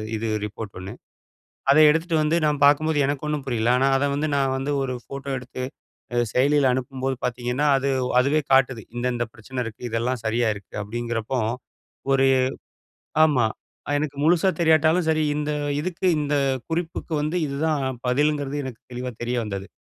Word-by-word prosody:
இது 110 Hz, +1 st, -2 dB, 0.2 s
ரிப்போர்ட் 105 Hz, 0 st, -7 dB
ஒண்ணு. 95 Hz, +4 st, -7 dB, 0.8 s
அத 140 Hz, -, +6 dB
எடுத்துட்டு 160 Hz, +2 st, 0 dB
வந்து 155 Hz, +2 st, +2 dB
நான் 150 Hz, -1 st, 0 dB
பார்க்கும்போது 150 Hz, +2 st, +4 dB
எனக்கு 145 Hz, +1 st, -2 dB
ஒண்ணும் 150 Hz, -2 st, -2 dB
புரியல. 115 Hz, -3 st, 0 dB
ஆனா 135 Hz, +2 st, +3 dB
அதை 145 Hz, +1 st, +1 dB
வந்து, 145 Hz, +2 st, 0 dB
நான் 135 Hz, -1 st, +1 dB
வந்து 135 Hz, +2 st, -2 dB
ஒரு 130 Hz, -1 st, -2 dB
ஃபோட்டோ 140 Hz, +2 st, -7 dB
எடுத்து 125 Hz, +1 st, -7 dB, 0.5 s
அ -, -, +1 dB, 0.2 s
செயலியில 140 Hz, 0 st, +3 dB
அனுப்பும்போது 130 Hz, +1 st, -2 dB
பார்த்தீங்கன்னா, 125 Hz, +3 st, -1 dB
அது 135 Hz, +1 st, -1 dB, 0.3 s
அதுவே 140 Hz, +4 st, +2 dB
காட்டுது, 130 Hz, -3 st, +4 dB
இந்த 120 Hz, +1 st, -2 dB
இந்த 120 Hz, 0 st, -1 dB
பிரச்சனை 125 Hz, +4 st, -7 dB
இருக்கு. 115 Hz, +1 st, -8 dB
இதெல்லாம் 115 Hz, +2 st, -1 dB
சரியா 115 Hz, +2 st, +1 dB
இருக்கு. 100 Hz, -, -13 dB
அப்படிங்கிறப்போ 120 Hz, +3 st, -3 dB, 0.7 s
ஒரு 135 Hz, 0 st, +4 dB, 1.0 s
ஆமா. 135 Hz, -7 st, +2 dB, 0.4 s
அ -, -, 0 dB
எனக்கு 145 Hz, -2 st, -3 dB
முழுசா 175 Hz, +3 st, +4 dB
தெரியாட்டாலும் 160 Hz, +1 st, +4 dB
சரி 155 Hz, 0 st, +2 dB
இந்த 150 Hz, 0 st, -1 dB, 0.3 s
இதுக்கு 185 Hz, +2 st, -2 dB
இந்த 150 Hz, 0 st, -1 dB, 0.4 s
குறிப்புக்கு 165 Hz, 0 st, -3 dB
வந்து 155 Hz, +3 st, -2 dB
இதுதான் 145 Hz, +1 st, -1 dB, 0.2 s
பதிலுங்கிறது 145 Hz, +2 st, +1 dB
எனக்கு 125 Hz, -3 st, -8 dB
தெளிவா 125 Hz, +1 st, -4 dB
தெரிய 120 Hz, +1 st, -1 dB
வந்தது. 100 Hz, -2 st, -5 dB
135 Hz, 160 wpm, -24 LUFS, 120-150 Hz, 1.0 s, அத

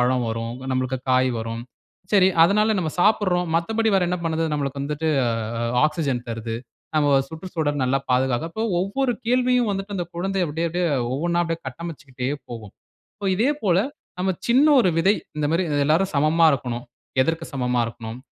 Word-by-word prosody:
பழம் 125 Hz, 0 st, +2 dB
வரும். 115 Hz, +1 st, -3 dB
இங்க 130 Hz, +1 st, -8 dB
நம்ளுக்கு 130 Hz, 0 st, -1 dB
காய் 130 Hz, 0 st, +3 dB
வரும்." 115 Hz, +1 st, -4 dB, 0.5 s
"சரி, 190 Hz, -1 st, +6 dB, 0.2 s
அதனால 210 Hz, +4 st, +3 dB
நம்ம 155 Hz, -3 st, -2 dB
சாப்பிடுறோம். 180 Hz, -4 st, +2 dB
மத்தபடி 220 Hz, +6 st, +1 dB
வேற 185 Hz, -, +2 dB
என்ன 180 Hz, -, -1 dB
பண்ணுது?" 165 Hz, 0 st, 0 dB
"நமக்கு 140 Hz, -1 st, -2 dB
வந்துட்டு, 150 Hz, +2 st, -1 dB, 0.8 s
ஆக்ஸிஜன் 140 Hz, -7 st, -2 dB
தருது. 115 Hz, 0 st, -4 dB, 0.4 s
நமம 145 Hz, -2 st, +4 dB
சுற்றுச்சூழல் 160 Hz, -4 st, -2 dB
நல்லா 135 Hz, +2 st, +1 dB
பாதுகாக்குது." 130 Hz, +4 st, +1 dB
அப்போ 220 Hz, +1 st, -2 dB, 0.2 s
ஒவ்வொரு 245 Hz, +6 st, 0 dB
கேள்வியும் 250 Hz, -2 st, +2 dB
வந்துட்டு 195 Hz, +1 st, -4 dB
அந்த 175 Hz, -, -2 dB
குழந்தை 190 Hz, +1 st, -1 dB
அப்டியே 165 Hz, +3 st, -1 dB
அப்டியே, 175 Hz, +1 st, 0 dB, 0.3 s
ஒவ்வொண்ணா 170 Hz, +4 st, +1 dB
அப்படியே 165 Hz, 0 st, -3 dB
கட்டமைச்சுக்கிட்டே 135 Hz, -4 st, -6 dB, 0.2 s
போகும். 110 Hz, -4 st, -8 dB, 0.5 s
இப்போ 200 Hz, -1 st, -3 dB
இதே 255 Hz, +7 st, +3 dB
போல, 180 Hz, -3 st, +3 dB, 0.4 s
நம்ம 190 Hz, +1 st, +1 dB, 0.2 s
சின்ன 260 Hz, +5 st, +5 dB
ஒரு 185 Hz, -, +4 dB
விதை 190 Hz, +5 st, +4 dB, 0.3 s
"இந்த 150 Hz, -, 0 dB
மாரி 170 Hz, +3 st, +2 dB, 0.2 s
எல்லாரும் 170 Hz, +6 st, +2 dB
சமமா 155 Hz, +3 st, +4 dB
இருக்கணும். 120 Hz, -3 st, -2 dB, 0.4 s
எதற்கு 165 Hz, +3 st, -1 dB
சமமா 125 Hz, -2 st, 0 dB
இருக்கணும்? 115 Hz, 0 st, -7 dB
160 Hz, 160 wpm, -23 LUFS, 130-190 Hz, 0.8 s, சரி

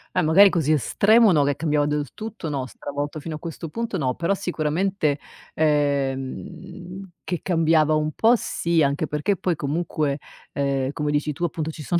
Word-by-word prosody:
Eh -, -, +3 dB
magari 185 Hz, +6 st, +6 dB
così 155 Hz, -3 st, +1 dB
estremo 210 Hz, -, +4 dB
no, 150 Hz, -4 st, +4 dB
che 140 Hz, -1 st, +1 dB
cambiava 150 Hz, -2 st, +1 dB
del 150 Hz, -2 st, -1 dB
tutto 220 Hz, -6 st, -7 dB
no, 135 Hz, -3 st, -3 dB
stravolto 145 Hz, +3 st, -5 dB
fino 160 Hz, +2 st, -6 dB
a -, -, -7 dB
questo 165 Hz, 0 st, -6 dB
punto 230 Hz, 0 st, -3 dB
no, 130 Hz, -4 st, 0 dB
però 170 Hz, +7 st, 0 dB
sicuramente, 170 Hz, -3 st, -1 dB, 0.4 s
ehm, 155 Hz, +6 st, -2 dB
che 175 Hz, -, -3 dB
cambiava 160 Hz, -3 st, +3 dB
un 155 Hz, 0 st, 0 dB
po' 225 Hz, +8 st, +4 dB
sì, 170 Hz, -7 st, 0 dB
anche 140 Hz, +2 st, 0 dB
perché 150 Hz, +7 st, 0 dB
poi 180 Hz, -3 st, 0 dB
comunque, 150 Hz, -1 st, -2 dB, 0.3 s
ehm, 140 Hz, -1 st, -1 dB
come 150 Hz, 0 st, -3 dB
dici 150 Hz, +1 st, 0 dB
tu 175 Hz, -, -2 dB
appunto 160 Hz, 0 st, -3 dB
ci 155 Hz, -, -10 dB
sono 170 Hz, +4 st, 0 dB
155 Hz, 175 wpm, -23 LUFS, 145-175 Hz, 0.4 s, magari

